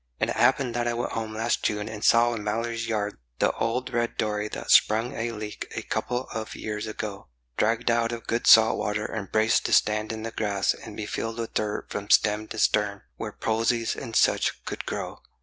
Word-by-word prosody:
And - - +1
it - - -3
happened 130 0 +3
that 120 0 -1
I 120 - 0
went 120 - -2
home 110 -1 -4
last 115 +2 0
June, 105 -1 -1
and 105 -1 -7
saw 120 +1 +5
in 110 -2 -5
Mallory's 115 +2 -2
yard 105 - -2 0.2
The - - +3
old 120 +3 -2
red 120 0 -1
dory 105 -1 -1
that - - -4
sprung 115 +4 +4
a 115 -1 -2
leak 105 -1 -7
a - - -3
couple 125 +1 -2
of 110 -1 -5
years 105 0 -4
ago, 105 -2 -6 0.3
Dragged 115 +2 +1
out 115 0 +1
of 115 -1 -6
good 115 +1 -1
salt 110 0 +7
water 105 +1 -1
and 105 -3 -5
braced 110 +1 +3
to - - -1
stand 105 +1 +3
in 110 0 -5
the 115 - -4
grass 100 -3 0
And - - -11
be - - -3
filled 115 0 -4
with 115 -1 -4
dirt 105 -1 -2
from 105 0 -5
stem 105 0 +3
to 110 - -7
stern, 105 -2 +1
where - - -5
posies 115 +1 0
and 115 -4 -7
such - - +2
could - - -5
grow. - - -4
110 Hz, 215 wpm, -26 LUFS, 105-115 Hz, 0.3 s, salt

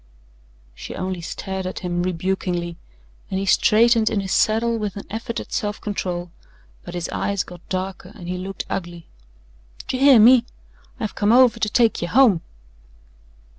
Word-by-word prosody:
She - - -8
only 185 -1 -4
stared 190 +2 -5
at 185 - -6
him 175 -1 -2
rebukingly, 175 -1 -2 0.5
and 190 - -2
he 195 - -2
straightened 225 +3 +4
in 210 - 0
his 190 -1 -4
saddle 230 +2 +2
with 210 -3 -3
an 200 - -7
effort 230 +2 -4
at - - -9
self 210 -1 -2
control 180 -4 -4 0.5
but 175 - -8
his 175 -2 -3
eyes 200 -2 -1
got 175 -1 -12
darker 185 0 -4
and 180 -6 -10
he 180 0 -3
looked 195 +1 -5
ugly. 175 -2 -5 0.8
"D'you 255 - -2
hear 270 -3 +7
me? 235 +2 +7 0.6
I've 215 -3 -3
come 205 0 +1
over 245 -1 +5
to 215 - 0
take 230 +1 +2
ye 175 - -1
home." 215 -3 +4
195 Hz, 165 wpm, -22 LUFS, 180-225 Hz, 0.8 s, hear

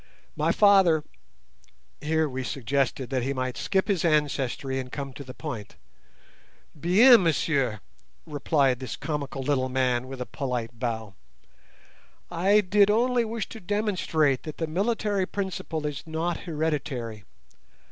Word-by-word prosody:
My - - +1
father—" 190 -7 +5 1.0
Here 160 +1 +1
we 130 -1 -4
suggested 135 0 -1
that 130 -2 0
he 135 +3 -1
might 130 -1 -3
skip 190 -1 0
his 195 -6 +1
ancestry 140 -4 0
and 130 -1 -6
come 140 -2 -5
to 140 - -8
the 130 -1 -10
point. 115 -10 -6 1.0
"Bien, 205 - +6
messieurs!" 140 -8 +1 0.5
replied 140 -4 +1
this 130 - -5
comical 140 -3 -4
little 130 -2 0
man, 130 -1 0
with 135 0 -8
a 125 - -3
polite 120 -4 -4
bow. 110 -4 -3 1.2
"I 195 +5 +4
did 200 +1 +4
only 240 +3 +3
wish 225 -1 -3
to 225 - -9
demonstrate 180 - 0
that 155 - -8
the 165 - -1
military 200 +3 0
principle 180 -5 -4
is 145 -2 -3
not 165 +2 -2
hereditary. 145 - -3
150 Hz, 135 wpm, -26 LUFS, 130-185 Hz, 1.2 s, Bien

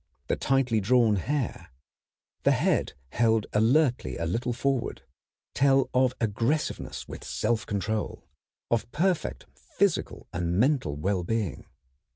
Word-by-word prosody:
The - - +2
tightly 130 -5 +1
drawn 115 0 +4
hair, 135 +6 -2 0.7
the - - +4
head - - +1 0.2
held 110 -2 +2
alertly 120 - +2
a 85 - -2
little 120 +9 -1
forward, 130 +1 -1 0.5
tell 135 -1 +3
of 130 0 +3
aggressiveness 115 +7 -1
with - - -8
self 110 +1 -1
control, 105 -4 -3 0.4
of 115 0 0
perfect 180 +3 0
physical 65 -1 -1
and 85 +1 -1
mental 125 - +2
well 90 +5 -1
being. 110 -1 -2
115 Hz, 120 wpm, -27 LUFS, 100-130 Hz, 0.7 s, drawn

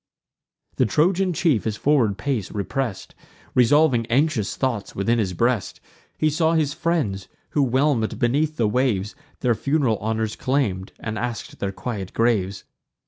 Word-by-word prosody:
The 130 - +3
Trojan 180 - +2
chief 165 - +1
his 110 -1 -2
forward 120 -9 +2
pace 125 -9 -2
repress'd, 110 +1 -3 0.4
Revolving 125 -1 +4
anxious 125 -4 +1
thoughts 120 -6 -2
within 115 +5 +1
his 95 -5 -1
breast, 115 -1 0 0.4
He 155 - +2
saw 160 +2 +2
his 155 -3 +1
friends, 145 - -1 0.2
who, 145 - +2
whelm'd 130 -3 +1
beneath 150 +6 +1
the 115 - +2
waves, 105 -4 0 0.3
Their 125 -2 +3
fun'ral 135 -3 0
honours 110 0 -2
claim'd, 105 -9 -1
and 110 -1 -4
ask'd 120 -1 -5
their 100 - -2
quiet 100 -3 -5
graves. 100 -5 +1
120 Hz, 140 wpm, -23 LUFS, 105-145 Hz, 0.4 s, Revolving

